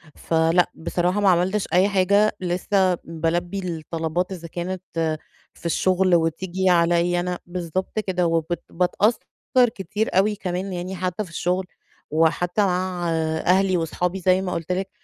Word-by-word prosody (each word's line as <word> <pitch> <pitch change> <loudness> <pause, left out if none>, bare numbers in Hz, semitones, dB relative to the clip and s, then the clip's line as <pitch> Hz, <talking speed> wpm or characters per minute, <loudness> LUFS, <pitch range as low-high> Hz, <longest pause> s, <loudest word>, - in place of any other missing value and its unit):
فلأ 165 +2 +2
بصراحة 180 +3 -1
ما 200 - +5
عملتش 185 +3 +2
أي 185 +3 +4
حاجة 200 +2 +3
لسّه 185 +1 +1
بَالبِّي 170 +3 -2 0.2
الطلبات 165 +3 -2
إذا 170 -3 -6
كانت 175 +2 -4 0.7
في - - -19
الشغل 185 +2 +2
وتيجي 175 +3 0
عليَّ 175 0 +3
أنا، 180 0 -2
بالضبط 180 +3 -3
كده، 185 -4 0
وبت 165 0 -1
باتأثر 185 +6 +1 0.6
كتير 205 +2 -2
أوي 210 +2 +3
كمان 185 -1 -4
يعني 180 +2 -4
حتى 185 +2 -2
في 185 - -12
الشغل، 180 +3 -1 0.5
وحتى 165 +5 +2
مع 180 -2 -1 0.4
أهلي 185 0 +3
وأصحابي 175 +3 -2
زي 185 +1 +3
ما 180 -1 -3
قُلْت 165 +1 -4
لِك 190 +1 -1
180 Hz, 140 wpm, -23 LUFS, 170-190 Hz, 0.7 s, ما